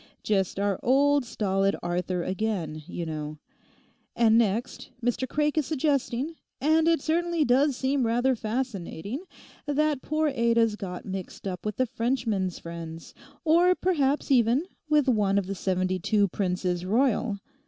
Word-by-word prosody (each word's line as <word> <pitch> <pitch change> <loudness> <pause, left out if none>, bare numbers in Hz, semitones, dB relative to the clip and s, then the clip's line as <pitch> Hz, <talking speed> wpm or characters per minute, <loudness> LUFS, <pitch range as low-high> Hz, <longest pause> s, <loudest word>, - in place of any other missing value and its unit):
Just 195 -4 0
our 200 -2 0
old 280 +1 +3
stolid 195 -3 0
Arthur 175 0 -1
again, 185 -6 -2
you 175 -2 -4
know. 155 -1 -5 0.8
And 225 -2 +4
next 230 +2 0 0.2
Mr 245 +1 0
Craik 300 +1 +1
is 295 - -2
suggesting, 290 0 -1 0.2
and 315 +3 +3
it 330 -3 +3
certainly 335 0 +1
does 270 +3 +3
seem 265 0 +1
rather 245 +3 +2
fascinating, 220 - -4 0.5
that 295 -1 +1
poor 310 0 0
Ada's 235 -4 +2
got 185 -4 -6
mixed 190 0 -6
up 180 -2 -5
with 210 - -2
the 255 - +1
Frenchman's 230 -6 -1
friends, 165 -1 -8 0.3
or 345 +3 +5
perhaps, 295 -7 0
even, 250 +4 +4 0.2
with 300 -2 +3
one 205 -5 +2
of 200 - +1
the 195 - -3
seventy 185 0 -1
two 205 +3 +2
Princes 180 -2 -1
Royal. 225 +1 +1
230 Hz, 145 wpm, -27 LUFS, 190-280 Hz, 0.8 s, or